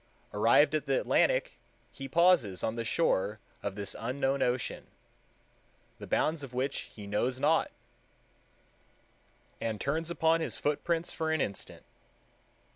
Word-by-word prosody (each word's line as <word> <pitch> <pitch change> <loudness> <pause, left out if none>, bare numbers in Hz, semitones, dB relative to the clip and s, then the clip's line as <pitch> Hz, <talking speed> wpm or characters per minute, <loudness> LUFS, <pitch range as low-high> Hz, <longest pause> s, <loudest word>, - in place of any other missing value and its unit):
Arrived - - +4
at - - -1
the - - +2
Atlantic, - - +1 0.3
he 135 - -7
pauses 170 - +3
on 110 - -1
the 115 - -2
shore 110 - +1 0.2
of 100 -1 -4
this 100 -1 -2
unknown 135 +3 -1
ocean, 125 0 -1 1.1
the - - -8
bounds 155 0 +1
of 130 -3 -9
which 135 +2 -2
he 105 - -8
knows 120 +6 -1
not, - - +3 1.9
and 110 -2 -2
turns 160 +7 -1
upon 165 -1 +2
his - - -3
footprints 165 +3 -1
for 160 -1 -2
an 160 - +1
instant." 100 -7 -4
135 Hz, 130 wpm, -30 LUFS, 110-160 Hz, 1.9 s, Arrived